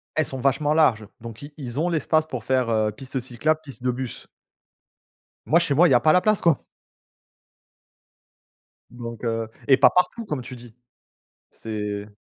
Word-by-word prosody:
elles 155 - +2
sont 135 - -6
vachement 140 +3 +1
larges, 115 -9 +3
donc 115 -1 -9
ils 145 +1 -10
ils 130 -3 -5
ont 170 +3 +1
l'espace 155 -1 +1
pour 125 -7 -5
faire, 130 -1 +1
heu, 110 -1 +1
piste 130 +5 -6
cyclable, 130 +6 -1
piste 135 -4 -11
de 125 - +2
bus. 125 0 -6 1.2
Moi 165 - +5
chez 145 - 0
moi 170 +5 +5
il - - +1
y - - +6
a 120 - +6
pas 155 - +5
la 180 - +6
place 215 0 +2
quoi. 165 -5 +4 2.3
Donc, 115 -1 -8
heu, 115 -1 -2 0.2
et 135 - +6
pas 135 - +7
partout 225 +6 0
comme 150 -10 -3
tu 125 +1 -9
dis. 120 -2 -14 0.7
C'est 105 -2 -5
130 Hz, 175 wpm, -23 LUFS, 115-155 Hz, 2.3 s, pas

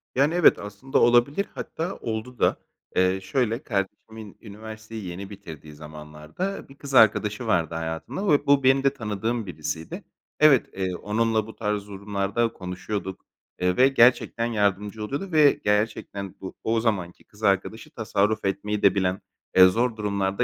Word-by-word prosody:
Yani, 140 +5 +3
evet, 175 -1 +5
aslında 105 +6 -2
olabilir, 120 +10 +3
hatta 170 +4 -4
oldu 115 +2 -5
da. - - +2 0.4
Eee, 95 +1 +2
şöyle, 120 +3 -1
kardeşimin 105 0 -5
üniversiteyi 110 0 -9
yeni 95 +2 -7
bitirdiği 80 -7 -11
zamanlarda 75 - -7
bir 135 - -14
kız 140 -1 -9
arkadaşı 110 -1 +4
vardı 85 -5 +1
hayatında 80 - -4
ve 145 -5 +3
bu 140 -1 +4
benim 135 +1 +4
de 135 0 +3
tanıdığım 110 -1 -3
birisiydi. 80 -2 -6 0.4
Evet, 150 -5 +5
eee, 95 -1 -2
onunla 110 +2 0
bu 110 - -11
tarz 105 -2 -2
durumlarda 100 +3 -2
konuşuyorduk, 95 +1 -6 0.3
eee, 90 0 +1
ve 130 - +6
gerçekten 120 -2 +3
yardımcı 105 -1 -1
oluyordu 140 - -4
ve 150 -3 +6
gerçekten 105 -2 -1
bu 95 - -7
o 115 0 +1
zamanki 100 -6 -2
kız 105 +1 -19
arkadaşı 100 +3 0
tasarruf 110 -2 0
etmeyi 105 +2 -2
de 100 -1 +4
bilen, 95 -1 0 0.3
eee, 95 - +9
zor 115 +6 +2
durumlar 100 -2 -1
da - - +2
105 Hz, 155 wpm, -25 LUFS, 95-120 Hz, 0.4 s, eee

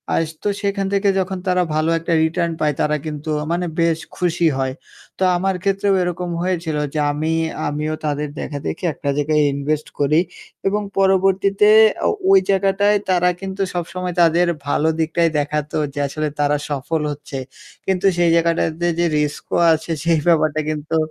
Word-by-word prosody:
আস 165 - +1 0.2
তো - - +1
সেখান 200 -1 -1
থেকে 200 0 +2
যখন 190 0 -2
তারা 180 0 +2
ভালো 155 +1 +1
একটা 165 +1 -2
return 170 +1 0
পায় 150 -1 +1
তারা 150 0 +1
কিন্তু 150 0 -5 0.2
মানে 175 +1 0
বেশ 165 -1 +2 0.2
খুশি 175 -1 +1
হয়। 130 -1 -1 0.4
তো - - -1
আমার 190 +1 0
ক্ষেত্রেও 195 0 +1
এরকম 180 0 -2
হয়েছিল 175 -4 -1 0.2
যে, 155 - -1
আমি 155 +2 -2 0.4
আমিও 150 +1 -2
তাদের 150 0 -2
দেখাদেখি 145 +4 -5
একটা 145 - -4
জায়গায় 150 +1 +2
invest 150 +2 -2
করি 145 +2 +3 0.5
এবং 205 +2 +1 0.2
পরবর্তীতে 195 +1 +3 0.4
আ - - +4 0.2
ওই 390 - +8
জায়গাটায় 195 +1 +3
তারা 180 -1 +3
কিন্তু 195 0 -5
সবসময় 180 +1 -3
তাদের 170 +1 +4 0.2
ভালো 150 +2 +1
দিকটাই 165 +1 +2
দেখাতো 150 0 -2 0.2
যে, 145 - -5
আসলে 155 +2 -3
তারা 145 0 +2
সফল 145 +3 -2
হচ্ছে 145 -1 -7 0.5
কিন্তু 190 0 0
সেই 175 -1 +3
জায়গাটাতে 165 0 +1
যে 175 - +3
রিস্কও 150 -1 -2 0.2
আছে 160 +1 -3
সেই 165 -2 +3
ব্যাপারটা 155 -2 +3
কিন্তু 155 +1 -2
165 Hz, 160 wpm, -20 LUFS, 150-185 Hz, 0.5 s, ওই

